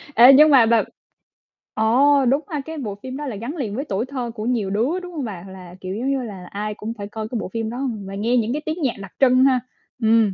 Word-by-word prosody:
Ê, 245 Hz, +4 st, +9 dB
nhưng 305 Hz, +3 st, +7 dB
mà 260 Hz, -5 st, +7 dB
bà 230 Hz, -1 st, +3 dB, 0.9 s
ồ, 265 Hz, +6 st, +4 dB
đúng 270 Hz, +4 st, +2 dB
ha, 300 Hz, -4 st, -3 dB
cái 320 Hz, 0 st, -7 dB
bộ 210 Hz, -8 st, -4 dB
phim 260 Hz, 0 st, -6 dB
đó 295 Hz, -, -5 dB
là 250 Hz, -7 st, -4 dB
gắn 235 Hz, -, -5 dB
liền 225 Hz, -9 st, -3 dB
với 275 Hz, +5 st, -3 dB
tuổi 205 Hz, +2 st, -2 dB
thơ 255 Hz, -3 st, -4 dB
của 215 Hz, -, -5 dB
nhiều 230 Hz, -6 st, 0 dB
đứa, 240 Hz, -, 0 dB
đúng 360 Hz, -1 st, -9 dB
hông 290 Hz, -5 st, -3 dB
bà? 185 Hz, -6 st, -7 dB
Là, 180 Hz, -2 st, -11 dB
kiểu 185 Hz, +1 st, -5 dB
giống 245 Hz, +4 st, -3 dB
như 270 Hz, -2 st, -1 dB
là, 195 Hz, -6 st, -8 dB
ai 210 Hz, +1 st, -3 dB
cũng 215 Hz, +2 st, -6 dB
phải 200 Hz, 0 st, -6 dB
coi 215 Hz, +1 st, -6 dB
cái 235 Hz, -, -2 dB
bộ -, -, -5 dB
phim 225 Hz, -1 st, -2 dB
đó 240 Hz, -, -6 dB, 0.3 s
và 195 Hz, -, -6 dB
nghe 230 Hz, +5 st, +1 dB
những 230 Hz, 0 st, 0 dB
cái 300 Hz, -, -2 dB
tiếng 315 Hz, +2 st, -3 dB
nhạc 255 Hz, -4 st, +1 dB
đặc 195 Hz, -2 st, -9 dB
trưng 255 Hz, -1 st, +5 dB
ha. 260 Hz, -2 st, +4 dB, 0.4 s
Ừm. 220 Hz, -2 st, +4 dB
235 Hz, 265 wpm, -21 LUFS, 210-270 Hz, 0.9 s, Ê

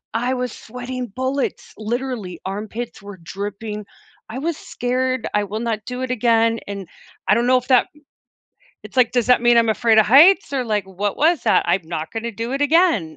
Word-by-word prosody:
I 245 Hz, +3 st, 0 dB
was 250 Hz, -2 st, -2 dB
sweating 250 Hz, +1 st, -7 dB
bullets, 260 Hz, +1 st, -3 dB
literally, 220 Hz, -5 st, -4 dB
armpits 215 Hz, +4 st, -5 dB
were 200 Hz, -2 st, -9 dB
dripping, 205 Hz, +3 st, -6 dB, 0.4 s
I 250 Hz, +4 st, -5 dB
was 325 Hz, +1 st, -2 dB
scared; 255 Hz, 0 st, -2 dB
I 210 Hz, -, +2 dB
will 210 Hz, +2 st, -5 dB
not 220 Hz, -3 st, -3 dB
do 250 Hz, 0 st, -5 dB
it 260 Hz, -, -3 dB
again, 230 Hz, -1 st, +2 dB
and 200 Hz, -3 st, -6 dB, 0.4 s
I 210 Hz, -, +6 dB
don't 235 Hz, +1 st, +1 dB
know 255 Hz, 0 st, +4 dB
if 250 Hz, -, -15 dB
that 255 Hz, -2 st, +4 dB, 1.0 s
It's, -, -, -13 dB
like, 250 Hz, -2 st, +4 dB
does 245 Hz, -3 st, +1 dB
that 250 Hz, -1 st, +4 dB
mean 240 Hz, 0 st, +5 dB
I'm 230 Hz, -1 st, +3 dB
afraid 220 Hz, 0 st, +3 dB
of 215 Hz, -, +5 dB
heights 320 Hz, -, +6 dB
or, 255 Hz, -2 st, 0 dB
like, 210 Hz, -3 st, -1 dB
what 195 Hz, +2 st, -3 dB
was 320 Hz, -2 st, +3 dB
that? -, -, +3 dB
I'm 185 Hz, -, +2 dB
not 160 Hz, -1 st, -4 dB
gonna 230 Hz, +1 st, -4 dB
do 230 Hz, +5 st, -4 dB
it 280 Hz, -, -1 dB
again. 290 Hz, -, +2 dB
235 Hz, 195 wpm, -20 LUFS, 210-255 Hz, 1.0 s, I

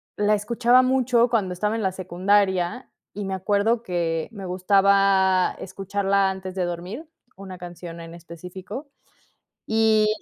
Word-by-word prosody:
la 210 Hz, +1 st, +2 dB
escuchaba 235 Hz, +4 st, +3 dB
mucho 255 Hz, -2 st, +3 dB
cuando 205 Hz, -6 st, 0 dB
estaba 210 Hz, +4 st, -1 dB
en 225 Hz, -, -2 dB
la 190 Hz, -, 0 dB
secundaria. 190 Hz, +4 st, 0 dB, 0.3 s
Y 205 Hz, -, -4 dB
me 195 Hz, -, -3 dB
acuerdo 205 Hz, +5 st, +1 dB
que 170 Hz, -5 st, -2 dB
me 200 Hz, -4 st, -8 dB
gustaba 190 Hz, 0 st, +3 dB
escucharla 195 Hz, +1 st, 0 dB
antes 190 Hz, -1 st, -6 dB
de 185 Hz, -2 st, -1 dB
dormir, 185 Hz, -, -6 dB, 0.3 s
una 190 Hz, -1 st, -9 dB
canción 175 Hz, -1 st, -9 dB
en 165 Hz, 0 st, -10 dB
específico. 180 Hz, -, -9 dB, 0.8 s
Y 220 Hz, -1 st, +3 dB
195 Hz, 135 wpm, -23 LUFS, 180-215 Hz, 0.8 s, escuchaba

